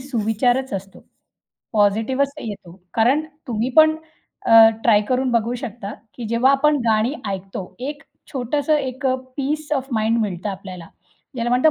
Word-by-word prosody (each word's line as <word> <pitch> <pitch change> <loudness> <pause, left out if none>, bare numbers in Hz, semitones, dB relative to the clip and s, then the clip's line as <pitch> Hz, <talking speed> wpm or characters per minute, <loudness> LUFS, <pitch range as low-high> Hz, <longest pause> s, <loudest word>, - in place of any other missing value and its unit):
सुविचारच 245 0 0
असतो. 195 0 -7 0.7
पॉझिटिव्हच 225 +6 +2
येतो. 195 -5 -8 0.2
कारण 260 +7 +3 0.2
तुम्ही 235 +1 -1
पण, 315 0 +7 0.5
अ, 225 -1 +9
ट्राय 220 -3 +5
करून 255 0 +1
बघू 235 0 +1
शकता, 235 -5 -6 0.2
की 240 - -7
जेव्हा 235 +3 +3
आपण 300 +2 +3
गाणी 220 +5 +2 0.2
ऐकतो. 190 -1 -6
एक 285 +2 -5 0.3
छोटंसं 285 +4 0
एक 265 -1 -3 0.3
पीस 300 +2 -2
ओएफ 270 -1 -2
माइंड 225 +1 +1
मिळतं 195 -2 -2
आपल्याला. 185 -3 -9 0.5
ज्याला 240 -1 -2
म्हणतात 250 +6 +4
240 Hz, 140 wpm, -21 LUFS, 215-270 Hz, 0.7 s, अ